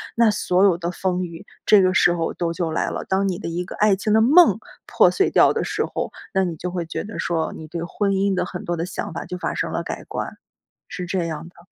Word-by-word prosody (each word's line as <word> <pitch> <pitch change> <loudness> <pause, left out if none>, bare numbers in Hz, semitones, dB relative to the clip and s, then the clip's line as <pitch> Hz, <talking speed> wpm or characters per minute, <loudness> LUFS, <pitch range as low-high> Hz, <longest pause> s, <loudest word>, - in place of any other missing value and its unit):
那 230 -2 +4
所 185 -2 +1
有 190 -4 +4
的 170 0 -3
风 185 0 -1
雨， 170 +1 -10 0.2
这 210 -2 +6
个 185 0 +3
时 175 -1 +4
候 165 -1 -2
都 170 -1 -2
就 170 -2 -2
来 - - 0
了， - - -4
当 195 +1 +1
你 185 -2 -1
的 185 - -5
一 170 +2 -2
个 - - -8
爱 210 -1 +4
情 210 +2 -1
的 220 - +5
梦 275 - +6 0.3
破 - - +4
碎 390 - +2
掉 - - +5
的 - - -1
时 - - -1
候， - - -4 0.2
那 190 -1 +2
你 170 -2 -3
就 180 +3 -5
会 175 -2 -3
觉 165 - -4
得 210 - -8
说， 165 -2 -1
你 160 - -9
对 170 +1 -5
婚 200 +3 -1
姻 195 +1 +1
的 180 -1 0
很 180 0 -7
多 175 0 -2
的 165 - -2
想 180 - -5
法 170 - -5
就 180 +1 -6
发 180 - -3
生 - - -2
了 - - -2
改 - - -6
观。 - - -5 0.5
是 180 -1 -5
这 180 -1 -1
样 165 0 -5
的。 170 -1 -20
180 Hz, 285 characters per minute, -22 LUFS, 170-195 Hz, 0.5 s, 这